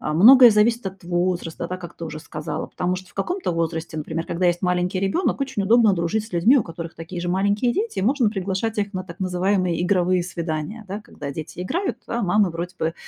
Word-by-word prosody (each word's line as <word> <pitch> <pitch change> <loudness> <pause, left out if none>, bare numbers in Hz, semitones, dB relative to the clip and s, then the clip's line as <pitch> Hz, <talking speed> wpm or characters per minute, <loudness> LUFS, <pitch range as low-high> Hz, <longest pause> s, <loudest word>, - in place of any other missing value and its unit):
А, 150 - -2
многое 245 - +9
зависит 220 +1 +2
от 190 -1 -7
возраста, 175 -1 -1
да, 185 - -3
как 175 -2 -10
ты 165 - -6
уже 155 -1 -6
сказала, 155 0 -5
потому 180 0 -2
что 185 +1 -10
в - - -26
каком-то 360 - -2
возрасте, 165 -1 -2
например, 160 +2 -4
когда 180 +1 0
есть 175 +1 +1
маленький 180 +1 0
ребенок, 195 - 0
очень 265 -7 -1
удобно 220 0 +5
дружить 185 +5 -1
с 225 - -18
людьми, 215 +11 +5
у - - +1
которых 165 0 -8
такие 170 +2 -7
же 175 - -3
маленькие 200 +6 +1
дети, 435 - -2
и - - 0
можно 250 0 +3
приглашать 200 +2 -2
их 200 0 -1
на 185 0 -3
так 175 0 -11
называемые 185 -1 0
игровые 180 -1 +2
свидания, 170 +4 -4
да. 200 +3 -4
Когда 145 -8 -8
дети 160 +4 -7
играют, 255 - -2
а 235 - -2
мамы 200 0 +3
вроде 175 +2 -5
бы 160 +1 -1
185 Hz, 220 wpm, -23 LUFS, 170-210 Hz, -, многое